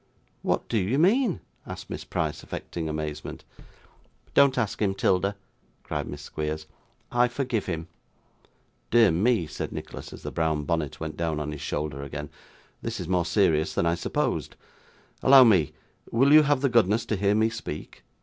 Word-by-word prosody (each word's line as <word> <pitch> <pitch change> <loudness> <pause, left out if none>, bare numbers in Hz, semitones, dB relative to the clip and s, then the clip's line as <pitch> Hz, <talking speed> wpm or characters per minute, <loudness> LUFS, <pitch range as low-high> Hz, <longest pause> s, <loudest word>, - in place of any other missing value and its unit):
'What - - -1
do 115 - +1
you 100 +8 0
mean?' 205 - +3 0.3
asked - - -7
Miss - - -5
Price, - - -2
affecting 80 -2 -5
amazement. 75 -1 -5 0.9
'Don't 140 -2 +5
ask 110 -4 -1
him, 95 -2 +1
'Tilda,' 100 +1 +1 0.5
cried - - -3
Miss - - -7
Squeers; 75 0 -4 0.5
'I 120 0 +4
forgive 120 -4 -2
him.' 80 -2 -3 1.0
'Dear 115 -4 +6
me,' 105 +3 +2
said 80 0 -5
Nicholas, - - -7
as - - -11
the - - -4
brown 80 -2 0
bonnet 80 -2 -2
went 80 -1 -5
down 80 -2 -1
on 75 0 -3
his 75 - -7
shoulder 75 -2 -3
again, 70 +1 -6 0.5
'this - - -4
is - - -5
more 90 -1 +1
serious 85 -5 +2
than - - +1
I 85 - +3
supposed. 85 - -2 0.7
Allow 135 0 +9
me! 95 - +4 0.4
Will 135 +5 +4
you 155 - +10
have 145 -2 +2
the 140 - +3
goodness 115 -2 +3
to 110 - -1
hear 100 +1 +2
me 110 +1 +3
speak? 115 -10 -7
95 Hz, 170 wpm, -26 LUFS, 80-120 Hz, 1.0 s, you